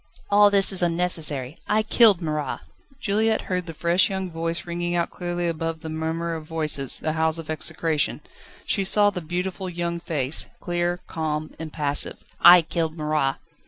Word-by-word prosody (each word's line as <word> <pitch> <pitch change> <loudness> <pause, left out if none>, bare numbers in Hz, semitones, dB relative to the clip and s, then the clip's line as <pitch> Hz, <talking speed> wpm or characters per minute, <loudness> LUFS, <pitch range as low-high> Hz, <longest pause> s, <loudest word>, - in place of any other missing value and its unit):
"All 205 0 +6
this 200 -1 +3
is 190 - +1
unnecessary. 165 -5 0
I 215 +1 +2
killed 215 -5 +5
Marat!" 150 -3 -3 0.4
Juliette 220 -2 +1
heard 180 -1 -3
the 165 - -6
fresh 170 +3 +2
young 190 -2 -3
voice 165 +1 -2
ringing 175 0 -2
out 170 -1 0
clearly 175 0 -3
above 165 -1 -3
the 160 - -6
murmur 160 +2 -3
of 160 -1 -7
voices, 155 -5 +1
the 155 - -2
howls 160 0 +1
of 160 -1 -6
execration; 155 -1 -1 0.4
she 200 - 0
saw 205 +2 +4
the 180 - -5
beautiful 180 +3 -4
young 170 -1 -3
face, 150 -4 -1
clear, 175 0 -1
calm, 155 -1 -3
impassive. 150 -3 -1 0.2
"I 175 0 +9
killed 165 0 -2
Marat!" 150 -3 0
170 Hz, 160 wpm, -24 LUFS, 155-180 Hz, 0.4 s, I